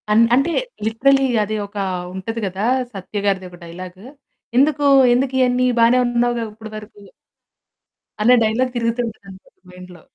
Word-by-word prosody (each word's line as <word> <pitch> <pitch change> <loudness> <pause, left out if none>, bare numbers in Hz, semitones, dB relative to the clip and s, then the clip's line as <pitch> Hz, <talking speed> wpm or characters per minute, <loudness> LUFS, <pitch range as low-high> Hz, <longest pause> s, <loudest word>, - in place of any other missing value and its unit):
అన్ 220 +2 +5
అంటే 275 +6 +1 0.3
లిటరల్లీ 270 +5 +2 0.2
అది 215 +1 -3
ఒక 200 - -31 0.4
ఉంటది 205 +5 -5
కదా! 190 +2 -3 0.3
సత్యగారిది 195 -1 -3
ఒక 175 - -14
డైలాగ్. 180 +2 -10 0.6
"ఎందుకు? 290 +1 +2 0.3
ఎందుకు 260 +1 0
ఇయన్నీ? 250 0 +2
బానే 235 +2 +5
ఉన్నావు‌గా 240 -1 0
ఇప్పడి 220 0 -11
వరకు?" 210 -1 -12 1.2
అనే 240 +4 +5
డైలాగ్ 240 +4 0
తిరుగుతుంటది 230 -1 -2
అంతే 190 0 -14 0.2
మైండ్‌లో. 180 -1 -13
225 Hz, 130 wpm, -19 LUFS, 195-245 Hz, 1.2 s, అన్